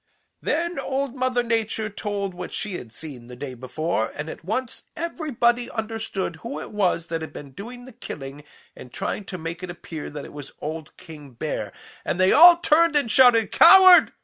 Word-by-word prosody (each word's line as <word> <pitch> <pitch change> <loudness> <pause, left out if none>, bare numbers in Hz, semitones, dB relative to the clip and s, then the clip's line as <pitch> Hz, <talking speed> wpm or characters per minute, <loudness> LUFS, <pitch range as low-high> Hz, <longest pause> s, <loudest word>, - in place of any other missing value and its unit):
"Then 340 +1 -1
Old 275 -1 -2
Mother 255 -2 0
Nature 225 -2 -1
told 200 -2 -4
what 180 0 -7
she 210 -2 -3
had 115 - -12
seen 125 -3 -9
the 125 - -10
day 130 +1 -7
before, 130 0 -3
and 150 +2 -5
at - - -12
once 230 +7 -4
everybody 245 -8 -1
understood 220 -6 -4
who 155 - -6
it - - -9
was 185 -5 0
that 165 -1 -4
had 160 - -7
been 140 -2 -10
doing 245 - -10
the 260 - -13
killing 145 - -8 0.3
and 125 - -12
trying 205 - -4
to 185 - -6
make 165 +1 -6
it 180 - -6
appear 165 -3 -8
that 145 -1 -8
it - - -12
was 145 -2 -10
old 155 +1 -7
King 150 -6 -12
Bear, 115 - -4 0.3
and 175 - -3
they 185 0 +4
all 345 +2 +9
turned 335 -1 +3
and 280 -6 +1
shouted 240 -4 +5
'Coward! 370 +1 +8
200 Hz, 190 wpm, -23 LUFS, 155-250 Hz, 0.3 s, all